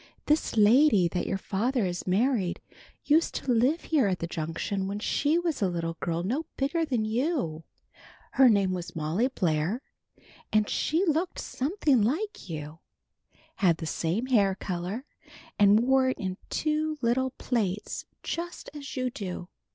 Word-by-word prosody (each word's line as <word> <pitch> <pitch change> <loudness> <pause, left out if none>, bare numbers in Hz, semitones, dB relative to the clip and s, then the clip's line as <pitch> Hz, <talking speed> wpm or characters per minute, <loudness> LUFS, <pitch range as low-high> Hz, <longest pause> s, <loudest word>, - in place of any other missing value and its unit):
"This 300 -6 +1
lady 215 - +6
that 180 - -2
your - - 0
father 220 +5 0
has 175 0 -4
married, 200 -1 +1 0.5
used 315 +3 +3
to 260 - -1
live 255 +8 +2
here 290 -9 +2
at 185 -2 0
the 170 - -3
Junction 170 +4 -3
when 200 +1 -3
she 290 +8 +1
was 340 -7 -1
a 195 - +2
little 165 -1 -3
girl 170 0 -2
no 270 - -2
bigger 285 +5 0
than 245 -8 0
you. 220 - -1 0.7
Her 265 -2 +6
name 200 -4 +3
was 180 -1 -5
Molly 165 +10 +1
Blair, 180 - -1 0.7
and 215 -1 +3
she 330 +5 +1
looked 330 +2 0
something 285 - +1
like 305 - -1
you 155 0 -6 0.8
had 175 -5 +3
the 160 - -5
same 170 +8 -1 0.3
color 180 -2 -4
hair, 245 +7 -5 0.5
and 205 +1 +6
wore 260 +1 +3
it 260 - -2
in 185 -1 -4
two 310 0 0
little 255 +3 +2
plaits 210 -5 -2 0.2
just 345 +1 -5
as 280 -2 -8
you 255 -1 0
do. 185 -7 -6
220 Hz, 155 wpm, -28 LUFS, 180-280 Hz, 0.8 s, lady